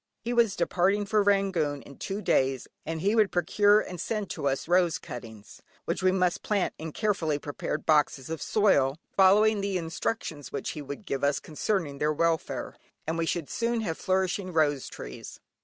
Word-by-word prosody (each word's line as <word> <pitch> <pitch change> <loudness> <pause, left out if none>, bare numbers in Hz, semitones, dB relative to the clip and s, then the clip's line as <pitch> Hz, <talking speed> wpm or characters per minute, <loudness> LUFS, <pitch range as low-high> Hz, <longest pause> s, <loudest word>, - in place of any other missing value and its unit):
He 240 +2 -2
was 230 -4 +3
departing 190 +4 +1
for 210 +1 +2
Rangoon 190 -8 +1
in 140 - -13
two 200 +2 -4
days, 135 -6 +1 0.2
and 160 0 -3
he 200 +4 +2
would 220 -2 +5
there 180 -2 0
procure 205 +5 +4
and 180 -4 -6
send 210 -2 -3
to 140 - -2
us 135 +2 -1
rose 175 -2 +3
cuttings, 110 -4 -10 0.2
which - - -2
we 185 0 +4
must 180 -2 +1
plant 205 -3 0
in 160 0 -5
carefully 175 -7 0
prepared 145 0 -4
boxes 150 -4 +2
of 160 -1 -5
soil, 145 -10 +3 0.2
follow 195 +2 +6
the 200 -3 +1
instructions 165 - -4
which - - -3
he 150 - -6
would 140 +8 -8
give 135 -6 -3
us 140 0 +2
concerning 155 -3 -2
their 150 +1 +2
welfare, 165 +1 -1 0.3
and 160 - -1
we 165 0 -1
should 165 -4 -1
soon 235 0 -1
have 170 -7 -2
flourishing 185 +1 -1
rose 150 -5 +1
trees. 60 0 -9
175 Hz, 185 wpm, -28 LUFS, 150-200 Hz, 0.3 s, follow